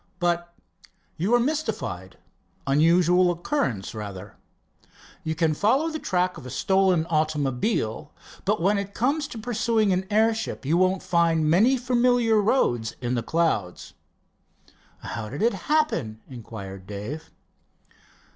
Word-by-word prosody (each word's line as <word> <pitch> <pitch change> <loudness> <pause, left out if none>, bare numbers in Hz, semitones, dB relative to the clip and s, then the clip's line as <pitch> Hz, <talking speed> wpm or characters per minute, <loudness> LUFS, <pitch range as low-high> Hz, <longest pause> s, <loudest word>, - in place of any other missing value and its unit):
"But 175 -1 -1 0.3
" - - -41
"You 195 +9 +2
are - - +4
mystified 220 - -3 0.5
unusual 170 +5 +4
occurrence 165 - -2
rather. 100 -4 -8 0.9
You 160 0 -2
can 160 -1 +1
follow 260 - +2
the 315 - -4
track 180 -5 -1
of - - -13
a - - -7
stolen 190 +3 +2
automobile. 150 - -1 0.3
But - - +1
when 200 +4 +2
it 200 0 -6
comes 285 +4 0
to 235 - -9
pursuing 220 -2 +1
an 185 +1 -1
airship, 220 -5 0
you 155 +5 +2
won't 185 +1 +2
find 165 -2 +2
many 215 +12 +4
familiar 245 -3 +2
roads 120 - +1
in 125 0 -2
the 120 - 0
clouds." 115 - -1 1.1
"How 110 -2 -5
did 140 - -4
it 235 - +3 0.2
happen?" 175 - +1
inquired 100 -6 -9
Dave. 105 +11 -6
175 Hz, 130 wpm, -25 LUFS, 135-220 Hz, 1.1 s, are